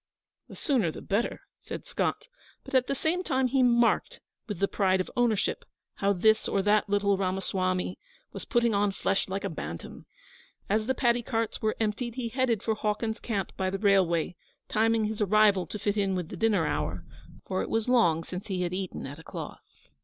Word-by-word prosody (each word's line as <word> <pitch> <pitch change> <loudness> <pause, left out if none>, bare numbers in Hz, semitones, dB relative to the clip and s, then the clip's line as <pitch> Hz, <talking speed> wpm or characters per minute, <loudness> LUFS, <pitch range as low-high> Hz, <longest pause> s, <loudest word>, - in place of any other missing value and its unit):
'The - - -10
sooner 240 - +1
the - - -8
better,' 210 +4 -1 0.2
said - - -7
Scott; - - -1 0.4
but - - -12
at 255 -1 +3
the 275 - 0
same 325 +6 0
time 265 -6 +1
he 260 +1 +2
marked, 240 -1 +3 0.3
with 210 - -4
the 200 - +2
pride 190 -2 +2
of 185 - -3
ownership, 235 -4 +1 0.3
how 200 0 +2
this 220 +3 +3
or 195 - +1
that 210 0 +3
little 200 -1 +2
Ramasawmy 185 -1 -1 0.3
was - - -6
putting 235 -2 +2
on 200 0 +2
flesh 195 0 0
like 195 +1 -3
a 200 - -1
bantam. 85 - -7 0.6
As 215 +2 +1
the 260 - +1
paddy 240 -1 +2
carts 225 -1 -2
were 215 0 +1
emptied 225 +2 -1
he 245 -3 -3
headed 240 -3 0
for 225 - +1
Hawkins's 215 +1 -2
camp 200 -6 -2
by 190 -1 -1
the 195 - -2
railway, 190 -5 +2 0.3
timing 225 0 +2
his 215 0 -3
arrival 205 -3 +4
to 210 - -5
fit 205 0 -1
in 195 -2 +1
with 180 -3 -3
the - - -6
dinner 210 -7 +2
hour, 80 - -2 0.4
for 185 - -1
it - - -4
was 225 0 0
long 175 -11 +3
since 180 +3 -7
he 185 -3 -1
had 175 0 -2
eaten 185 -1 -4
at 140 +3 -8
a - - -12
cloth. - - -7
205 Hz, 200 wpm, -28 LUFS, 190-230 Hz, 0.6 s, arrival